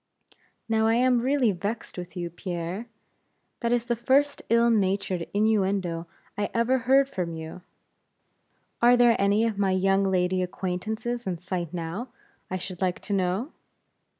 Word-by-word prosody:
"Now 220 -1 +2
I 225 - +3
am 250 0 +3
really 260 -3 +2
vexed 205 +5 -4
with 180 0 -8
you, 175 -1 -3
Pierre; 175 +4 -5 0.7
that 235 -1 -1
is 240 -1 +1
the 240 0 0
first 275 +5 +2
ill 235 +1 +4
natured 190 -4 0
innuendo 195 -5 +1 0.3
I 205 0 -1
ever 240 +3 +2
heard 265 +3 +4
from 180 -10 -3
you. 160 +2 -8 1.2
Are 245 +1 +6
there 240 -1 +5
any 200 +3 +3
of 220 -3 -2
my 195 -2 +2
young 195 +1 +2
lady 185 0 +1
acquaintances 215 +6 -3
in 180 -2 -1
sight 175 -2 -4
now, 175 +7 -4 0.4
I 185 - -2
should 185 0 -7
like 180 -1 0
to 205 - -4
know?" 195 - 0
200 Hz, 150 wpm, -26 LUFS, 180-235 Hz, 1.2 s, Are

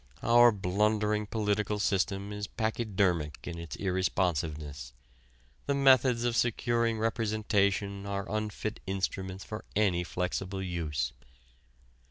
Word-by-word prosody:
Our 120 +1 +7
blundering 105 +2 +1
political 105 -1 0
system 100 0 0
is 105 0 -4
pachydermic 100 - 0
in 85 -1 -5
its 80 -4 -6
irresponsiveness. 80 -8 -1 0.7
The 140 - +2
methods 130 -3 +5
of 120 -1 +1
securing 115 -1 +1
representation 105 -3 0
are 100 -1 -2
unfit 110 0 -3
instruments 95 0 -3
for 110 -1 -7
any 95 -4 +2
flexible 90 +2 -3
use. 85 -5 -2
100 Hz, 105 wpm, -30 LUFS, 90-110 Hz, 0.7 s, Our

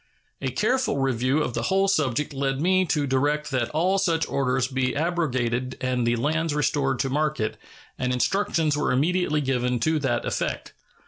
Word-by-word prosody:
A 135 - -1
careful 220 - 0
review 135 +2 +1
of 120 - -3
the - - -2
whole 195 +1 +2
subject 150 -6 0
led 135 -1 -1
me 185 +3 +3
to 150 -3 +1
direct 145 +3 0
that 125 -3 0
all 180 +7 +1
such 165 -4 +1
orders 130 -1 0
be 130 -1 -1
abrogated 130 -7 -1
and 125 -2 0
the 120 - +2
lands 155 +5 0
restored 140 -2 +1
to 135 - -1
market, 150 -6 0 0.4
and 125 0 0
instructions 160 +2 +1
were 150 - 0
immediately 155 +2 +1
given 125 -2 0
to 160 +3 +2
that 125 -4 -1
effect. - - -3
140 Hz, 170 wpm, -25 LUFS, 130-160 Hz, 0.4 s, me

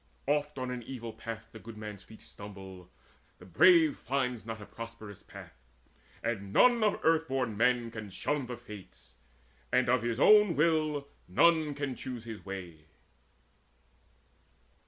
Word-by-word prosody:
Oft 150 0 0
on 130 -1 -3
an 125 -1 -4
evil 120 -2 -7
path 115 0 -7
the 110 - -11
good 115 0 -10
man's 105 -2 -7
feet 110 +1 -15
Stumble, 95 -3 -11 0.5
the 90 - -14
brave 160 - +5
finds 125 -3 -2
not 110 0 -5
a 105 - -9
prosperous 110 -3 -9
path; - - -12 0.7
And 100 -4 -3
none 240 - +5
of 210 - +2
earth 160 0 +3
born 130 -6 -1
men 120 +1 +2
can 110 -2 -7
shun 140 +6 -2
the 120 -1 -5
Fates, 105 - -13 0.5
And 125 -1 +3
of 130 -1 +3
his 120 0 -2
own 210 -1 +6
will 155 -2 +1 0.2
none 155 - +3
can 140 -2 -3
choose 125 -2 -7
his 110 -3 -8
way. 90 -5 -8
120 Hz, 150 wpm, -31 LUFS, 105-145 Hz, 0.7 s, own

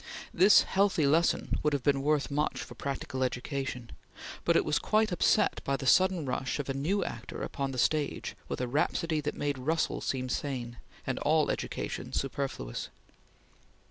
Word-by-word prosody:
This 195 +4 +7
healthy 190 -6 +2
lesson 160 +4 +2
would 150 -1 +1
have 140 -3 -1
been 140 0 +2
worth 150 0 +1
much 140 -4 -1
for - - -10
practical 135 -1 -3
education, 130 -1 -3 0.5
but - - +3
it - - +3
was - - +1
quite 215 -1 +2
upset 175 - +2
by 135 0 0
the 135 - -6
sudden 185 +3 +4
rush 130 0 -2
of 145 - -4
a - - 0
new 175 +9 0
actor - - -6
upon 140 -1 -3
the 130 - -6
stage 150 +4 0
with - - -4
a 125 - -1
rhapsody 155 +4 0
that 150 0 -3
made 145 -2 -1
Russell 155 +5 0
seem 130 -1 -2
sane, 125 -3 -3 0.3
and 130 - -2
all 155 +1 +2
education - - -4
superfluous. 135 - -3
140 Hz, 170 wpm, -30 LUFS, 130-155 Hz, 0.5 s, This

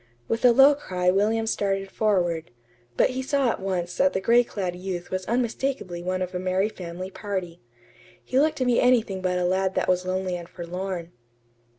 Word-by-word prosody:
With 230 - -2
a 250 - +8
low 270 +4 +7
cry 180 -10 0
William 215 +4 +1
started 195 -3 -1
forward; 175 -6 0 0.5
but - - +4
he 260 +1 -3
saw 270 -2 +1
at - - -5
once 180 -2 -3
that 280 0 +3
the - - 0
gray 235 +5 +4
clad 185 -6 -4
youth 180 -1 -5
was 185 0 -3
unmistakably 235 -6 -2
one 185 +1 -1
of 185 - -6
a 180 - -2
merry 185 +3 0
family 185 -1 -7
party. 185 -5 -5 0.6
He 260 - +1
looked 310 +2 +2
to 255 - 0
be 245 -1 +3
anything 230 -6 +2
but 180 -1 0
a 180 - 0
lad 190 +1 +1
that - - 0
was 180 0 +2
lonely 185 0 -2
and 170 -1 -8
forlorn. 175 0 -5
190 Hz, 195 wpm, -25 LUFS, 180-230 Hz, 0.6 s, a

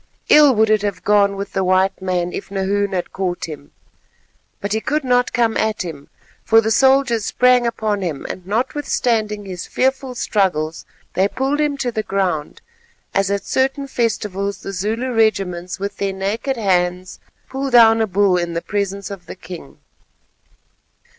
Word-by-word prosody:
Ill 295 -4 +7
would 220 0 +3
it 215 -1 +3
have 205 -1 -3
gone 200 -1 +3
with 200 0 -6
the 190 - 0
white 185 +1 +2
man 180 -1 -1
if - - -6
Nahoon 200 +1 -1
had 180 -2 -3
caught 185 -2 -2
him. 150 -3 -9 0.9
But 200 +1 -3
he 220 - 0
could 300 +4 -1
not 250 -1 +2
come 230 -2 +1
at 215 -1 0
him, 150 -5 -8 0.3
for 225 - +5
the 220 0 0
soldiers 265 -2 +3
sprang 250 -1 +3
upon 215 -3 -1
him 165 -7 -4
and 185 -1 -7
notwithstanding 225 -3 -1
his 180 -3 -6
fearful 265 0 -1
struggles 175 -9 -1 0.3
they 190 +2 +2
pulled 270 +6 -1
him 295 -2 0
to 250 -3 -2
the 220 - -2
ground, 185 -7 -2 0.5
as 195 0 +1
at 200 0 -2
certain 270 +2 0
festivals 210 -6 -2
the 195 - -5
Zulu 225 +7 -2
regiments 185 -6 0
with 200 +1 -5
their 195 -1 -1
naked 210 +7 -2
hands 180 -3 0 0.3
pull 270 +1 -3
down 225 -2 +6
a 220 - +1
bull 195 -1 +2
in 175 -1 -2
the 170 - -2
presence 200 -1 -3
of 190 -3 -9
the - - -7
king. 180 -6 -10
205 Hz, 165 wpm, -19 LUFS, 185-235 Hz, 0.9 s, Ill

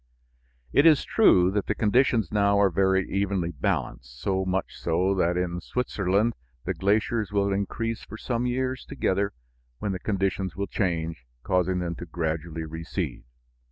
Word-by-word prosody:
It 145 +4 +6
is 155 -3 +5
true 95 - +5
that 100 0 -1
the - - 0
conditions 115 -2 +2
now 100 -1 +3
are 100 -2 +4
very 95 +1 +2
evenly 95 -3 -1
balanced, 65 -3 -3
so 95 +3 0
much 95 0 -2
so 90 +4 +1
that 90 -2 +1
in 90 -1 -2
Switzerland 110 -2 0 0.3
the - - 0
glaciers 105 +2 +1
will 100 -1 +1
increase 115 +3 -2
for 110 - -9
some 120 +1 -1
years 130 0 -1
together, 100 +2 -1 0.5
when 100 - -2
the 95 - -3
conditions 95 -3 -1
will 100 +1 -2
change, 85 - -2 0.2
causing 90 -1 +1
them 90 -1 -2
to 85 - -7
gradually 80 0 -3
recede. 80 -5 -5
95 Hz, 155 wpm, -26 LUFS, 85-105 Hz, 0.5 s, It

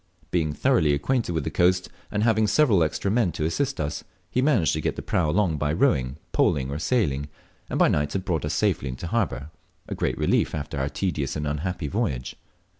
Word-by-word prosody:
Being 80 -4 +1
thoroughly 80 - +3
acquainted 115 - 0
with 80 -3 -1
the - - -3
coast, 90 +1 +2 0.2
and 105 - -1
having 110 -1 +3
several 105 - +4
extra 80 +5 0
men 110 -5 +2
to 80 -1 -2
assist 135 - -1
us, 75 0 -3 0.3
he 125 - +1
managed 130 - +3
to - - -1
get - - -1
the - - -6
prau 80 -4 +1
along 85 -2 +1
by 75 0 0
rowing, 65 -4 +1
poling, 65 -1 +1
or 70 - -3
sailing, 75 - 0 0.4
and - - -2
by - - +5
night 75 0 0
had 95 -1 -2
brought 85 -5 -1
us 75 +1 -1
safely 65 - +1
into 65 +6 -6
harbour, 85 - -1 0.4
a - - -4
great - - -1
relief - - +1
after 70 -2 -4
our 70 +1 0
tedious 75 -6 -2
and 75 -1 -2
unhappy 75 +3 -2
voyage. 70 - -2
80 Hz, 205 wpm, -25 LUFS, 75-105 Hz, 0.4 s, by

